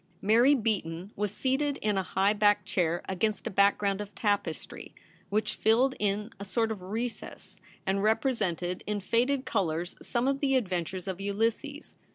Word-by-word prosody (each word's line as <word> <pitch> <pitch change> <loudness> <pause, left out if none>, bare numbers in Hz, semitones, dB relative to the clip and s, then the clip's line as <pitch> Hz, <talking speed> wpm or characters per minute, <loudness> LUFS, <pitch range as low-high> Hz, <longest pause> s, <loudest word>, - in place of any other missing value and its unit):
Mary 235 +8 +5
Beaton 195 - -2
was 205 -1 -1
seated 270 +5 0
in 210 -1 0
a 190 - +2
high 195 +2 +1
backed 205 -1 +3
chair 175 -2 0
against 200 +2 -1
a - - -2
background 200 0 +2
of 205 0 -9
tapestry, 205 -7 -2 0.3
which 215 +1 0
filled 245 +5 +3
in 210 +2 -1
a - - -5
sort 225 +3 0
of 210 -4 -5
recess, 225 +6 -6 0.3
and 195 0 +1
represented 205 - 0
in 210 0 -1
faded 250 +7 +1
colours 170 -1 -1
some 240 +1 -1
of 275 0 +1
the 270 -2 +2
adventures 185 -5 -2
of 190 0 -4
Ulysses. 225 +9 -2
205 Hz, 160 wpm, -29 LUFS, 190-230 Hz, 0.3 s, Mary